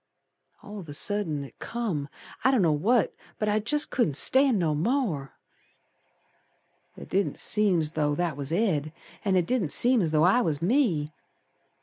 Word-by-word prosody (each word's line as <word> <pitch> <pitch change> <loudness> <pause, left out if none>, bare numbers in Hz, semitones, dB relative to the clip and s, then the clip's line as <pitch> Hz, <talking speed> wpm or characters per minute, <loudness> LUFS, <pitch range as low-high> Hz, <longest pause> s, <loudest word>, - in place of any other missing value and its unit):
All 210 0 -9
of 170 -5 -11
a 145 - -4
sudden 165 -5 -1
it 140 - -14
come, 190 -12 -4 0.3
I - - +4
don't 255 -7 +2
know 165 - +3
what, 210 +12 +1 0.2
But 215 - -1
I 210 +1 +1
jest 295 +8 -1
couldn't 160 - 0
stand 260 - +4
no 165 -5 0
more. 165 - -1 1.6
It - - -10
didn't 195 +1 -1
seem 200 -6 +2
's 150 - -1
though 150 -2 0
that 170 -2 -2
was 140 +1 -5
Ed, 165 -6 0 0.3
An' 195 -3 +1
it 180 -2 +2
didn't 215 -7 -1
seem 245 -1 +4
as 165 - 0
though 155 0 +2
I 195 +8 +4
was 155 -7 -1
me. 175 - +1
180 Hz, 175 wpm, -26 LUFS, 150-230 Hz, 1.6 s, I